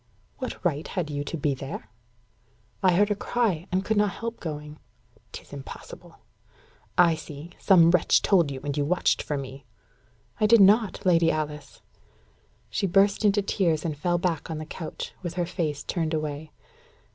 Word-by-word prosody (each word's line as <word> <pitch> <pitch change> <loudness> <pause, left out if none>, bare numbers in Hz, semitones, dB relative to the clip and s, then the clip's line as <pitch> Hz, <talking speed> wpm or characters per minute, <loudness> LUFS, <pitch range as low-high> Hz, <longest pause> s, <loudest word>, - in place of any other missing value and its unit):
"What 255 -7 -6
right 155 -3 0
had 170 -5 -3
you 145 0 -2
to 165 - -4
be 145 -1 0
there?" 135 -3 -7 0.9
"I 185 -2 +4
heard 205 +3 +3
a - - +2
cry, 205 -6 -1
and 190 +1 0
could 220 +1 0
not 205 0 +3
help 230 +3 -5
going." 150 -2 -6 0.5
"Tis - - -10
impossible. 140 -1 -10 0.8
I 175 -2 +6
see. 155 +1 -8
Some 170 -3 +6
wretch 180 -2 +3
told 175 -7 +4
you, 135 -1 -6
and 145 -1 -3
you 145 - +1
watched 175 +5 +1
for 150 - -3
me." 135 0 -7 0.8
"I 215 - +4
did 230 +1 +6
not, 205 +1 +4
Lady 170 -2 +4
Alice." 150 -3 -4 0.9
She 195 - 0
burst 195 +3 +3
into 205 -1 +3
tears, 170 -6 0
and 155 -3 -2
fell 175 +4 0
back 170 -3 -2
on 160 - -3
the 155 - -5
couch, 160 0 -7
with 175 -2 -5
her 175 -1 0
face 155 -4 -3
turned 165 -2 -1
away. 155 0 -4
165 Hz, 170 wpm, -26 LUFS, 150-190 Hz, 0.9 s, I